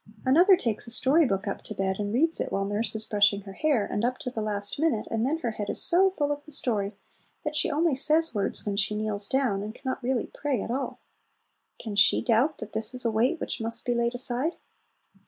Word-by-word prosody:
Another 350 +9 +6
takes 230 -4 -2
a - - -7
story 275 +6 +3
book 195 -1 -2
up 200 - -3
to - - -8
bed, 190 0 -1
and 205 0 -2
reads 320 +8 +2
it - - -3
while 195 0 -1
nurse 205 +3 -1
is 220 0 -4
brushing 205 -1 +3
her 195 -1 -10
hair, 275 -3 +1
and 205 - -3
up 250 +1 0
to 250 - -6
the 225 - -4
last 205 +2 -1
minute, 310 -9 0
and 225 +2 0
then 310 +4 0
her 245 -8 -3
head 210 -1 -5
is - - 0
so 375 +3 +5
full 290 -6 -2
of 290 0 -4
the 305 - -13
story 210 -7 -1 0.5
that 300 0 -3
she - - +2
only 310 +1 +1
says 310 +4 +3
words 200 -3 -2
when 205 -1 -2
she 205 +1 0
kneels 210 -1 0
down, 260 -8 0
and 215 +2 -6
can - - -18
not 260 - -2
really 250 -1 -1
pray 285 -5 -2
at - - -5
all. 270 +3 -4 0.8
Can 215 -3 -6
she 195 -1 +5
doubt 250 +6 +2
that 220 -1 -9
this 220 +3 0
is 250 - -3
a 230 - +2
weight 245 +10 +1
which - - -3
must 225 +1 -2
be 245 - +1
laid 235 0 0
aside? 255 +6 -2
235 Hz, 245 wpm, -27 LUFS, 210-285 Hz, 0.8 s, Another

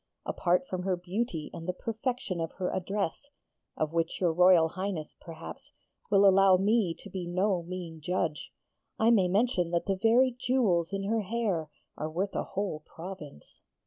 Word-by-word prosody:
Apart 180 +8 +1
from 185 -5 -3
her 185 0 0
beauty 180 -2 -3
and 165 0 -7
the 180 - 0
perfection 225 -3 -3
of 165 - -3
her 185 -1 -2
address 195 +7 -2 0.5
(of 155 0 -1
which 165 0 -1
your 175 -3 +2
Royal 180 -1 +6
Highness, 185 -3 -4
perhaps, 165 -1 -10 0.4
will 200 -1 +6
allow 195 -1 +6
me 200 -3 +2
to 200 - -10
be 180 -2 -4
no 185 +1 +1
mean 170 -2 -7
judge), 165 -2 -2 0.5
I 225 +1 +4
may 195 -6 +4
mention 190 -2 +1
that 170 0 0
the 195 - +1
very 245 +3 +5
jewels 205 -11 +2
in 195 0 -2
her 220 +3 +1
hair 200 -7 -1 0.3
are 155 - -2
worth 185 +5 -2
a - - 0
whole 195 -5 -3
province.' 160 - -10
185 Hz, 170 wpm, -29 LUFS, 170-205 Hz, 0.5 s, Royal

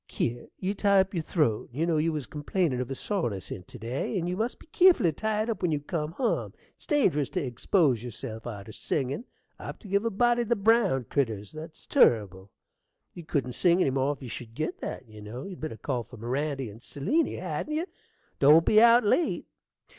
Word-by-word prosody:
Kier, 120 0 -3
you 190 +1 -2
tie 200 -1 +3
up 190 +1 +1
your 170 - 0
throat: 150 - 0
you 150 +7 -1
know 165 -2 +1
you 160 +2 +2
was 150 -4 -3
complainin' 150 -3 -1
of 125 - -4
a 135 - -3
soreness 125 - -2
in't 90 -2 -7
to - - -10
day; 120 - -3
and 175 -1 -1
you 180 - -1
must 225 +5 -2
be - - -17
keerful 350 - +5
to 165 - +4
tie 215 +6 -1
it 225 - -5
up 220 - -5
when 175 -3 +1
you 150 - +1
cum 150 +1 -3
hum: 245 +5 -1 0.2
it's - - -18
dangerous 175 - +2
t' 180 - -2
egspose 130 - +1
yerself 115 -1 -7
arter 105 -2 -7
singin' 140 - -2 0.3
apt - - -8
to - - -10
give 200 +2 +1
a 230 - +1
body 240 +3 +2
the 235 0 +1
brown 200 - +3
critters, 115 -5 -2
and 155 - -7
that's 160 0 -12
turrible. 100 - +3 0.6
You 175 - -9
couldn't 130 -5 -1
sing 175 +6 +3
any 140 - +3
more 135 +2 +1
if 140 - -13
you 125 - -6
should 115 -1 -8
git 155 +5 -3
that, 130 - -5
you 110 -1 -12
know. 115 +5 -7
You'd 190 -3 -8
better 155 -8 -5
call 125 -1 -2
for 120 +2 -12
Mirandy 135 +1 -2
and 110 +3 -14
Seliny, 285 - 0
hadn't 180 - -3
you? 325 +3 0 0.5
Don't 150 +4 +7
be 215 0 +6
out 235 +1 +7
late. 265 +11 +1
155 Hz, 220 wpm, -28 LUFS, 125-200 Hz, 0.6 s, Don't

